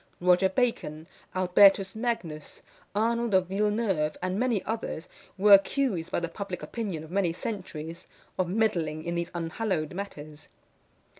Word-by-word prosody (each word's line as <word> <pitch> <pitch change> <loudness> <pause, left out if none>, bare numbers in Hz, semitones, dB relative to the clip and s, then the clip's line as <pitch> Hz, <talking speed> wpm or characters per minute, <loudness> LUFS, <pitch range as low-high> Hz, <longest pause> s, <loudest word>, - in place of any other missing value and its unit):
Roger 180 +1 +4
Bacon, 185 -8 -1 0.3
Albertus 195 +1 +5
Magnus, 205 -10 -4 0.3
Arnold 230 0 +1
of 185 -1 +4
Villeneuve, 200 -6 0
and 185 +2 -2
many 240 -5 +1
others, 220 -6 -4 0.3
were 200 +2 +7
accused 195 -4 +3
by - - +1
the 170 - -2
public 185 +1 -6
opinion 195 -9 -4
of 160 - -12
many 190 -3 +1
centuries, 170 -4 -6 0.3
of 180 -2 +1
meddling 170 -7 0
in 170 +1 -3
these 170 0 -2
unhallowed 170 -1 -2
matters. 155 -6 -8
185 Hz, 135 wpm, -28 LUFS, 165-210 Hz, 0.3 s, were